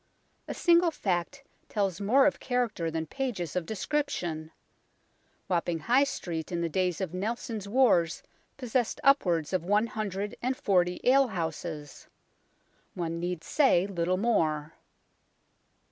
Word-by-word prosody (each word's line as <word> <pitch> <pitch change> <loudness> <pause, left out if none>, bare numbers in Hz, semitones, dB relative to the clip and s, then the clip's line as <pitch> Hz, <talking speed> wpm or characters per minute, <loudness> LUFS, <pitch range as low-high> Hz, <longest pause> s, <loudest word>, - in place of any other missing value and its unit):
A - - -4
single 345 0 +4
fact 195 - -2 0.3
tells 195 -4 -1
more 255 +7 +4
of 290 - +2
character 240 -9 -1
than 160 0 -3
pages 200 - -4
of 175 -3 -2
description. 185 - -2 1.0
Wapping 175 -2 0
High 255 - +4
Street 170 - -5
in 170 -1 -1
the 170 - -1
days 180 0 0
of 185 -3 -3
Nelson's 215 +1 -3
wars 205 -9 +3 0.3
possessed 250 -2 -1
upwards 180 - +3
of 185 -3 +1
one 205 +5 +2
hundred 210 -2 -4
and 255 +2 -1
forty 180 -2 +1
ale 270 +1 +5
houses. 160 - -5 0.9
One 170 -2 -3
need 175 -1 -3
say 260 - +3
little 180 -2 -1
more. 160 -8 0
190 Hz, 130 wpm, -29 LUFS, 170-245 Hz, 1.0 s, ale